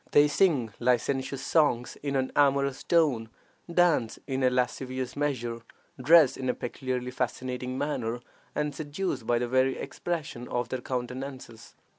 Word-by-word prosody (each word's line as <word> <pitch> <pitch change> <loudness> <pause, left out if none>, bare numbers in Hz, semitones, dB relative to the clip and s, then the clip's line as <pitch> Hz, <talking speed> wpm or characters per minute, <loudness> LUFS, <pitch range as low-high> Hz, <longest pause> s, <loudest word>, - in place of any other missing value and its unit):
They 145 0 +7
sing 145 - +2
licentious 130 +2 0
songs 125 -7 +2
in 140 -1 -3
an 130 -1 0
amorous 140 -1 +3
tone, 145 -10 +2 0.4
dance 170 -10 +3
in 135 -1 -2
a 130 - +5
lascivious 130 0 -2
measure, 125 -5 -2 0.4
dress 155 0 +6
in 130 -1 -2
a - - +1
peculiarly 125 0 -3
fascinating 125 0 -3
manner, 120 -5 -2 0.4
and 150 -1 -1
seduce 155 +5 -3
by 120 +1 +1
the 120 +1 -1
very 130 +1 +2
expression 155 -8 -4
of 120 -1 -2
their 130 - -3
countenances. 125 -2 -6
130 Hz, 140 wpm, -28 LUFS, 125-145 Hz, 0.4 s, They